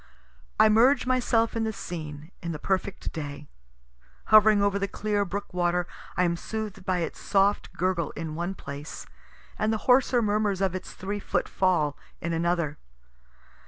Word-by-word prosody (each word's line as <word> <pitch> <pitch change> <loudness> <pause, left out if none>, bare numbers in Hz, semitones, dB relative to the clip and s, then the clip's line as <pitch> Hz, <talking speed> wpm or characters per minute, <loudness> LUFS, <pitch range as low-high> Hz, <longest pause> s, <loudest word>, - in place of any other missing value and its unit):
I - - +8
merge 245 +5 +5
myself 245 -3 +2
in 225 - 0
the 220 - 0
scene, 155 -5 -7
in 170 -1 -3
the - - -4
perfect 190 +3 -2
day. 145 -2 -6 0.9
Hovering 215 -1 +7
over 200 0 +2
the 200 - 0
clear 205 +1 -1
brook 200 +1 -5
water, 175 0 +1 0.3
I 180 - +4
am 170 -1 +2
sooth'd 215 0 -5
by 180 -1 0
its 165 - -4
soft 200 0 +2
gurgle 175 -2 0
in 160 0 -4
one 175 +4 -3
place, 145 -2 -8 0.5
and 215 +1 +2
the 220 - -3
hoarser 250 -1 +4
murmurs 205 -2 +1
of 195 -2 +1
its 185 0 -6
three 200 +2 -4
foot - - -1
fall 170 -6 +1 0.2
in 170 0 -3
another. 170 -2 0
190 Hz, 160 wpm, -27 LUFS, 170-215 Hz, 0.9 s, I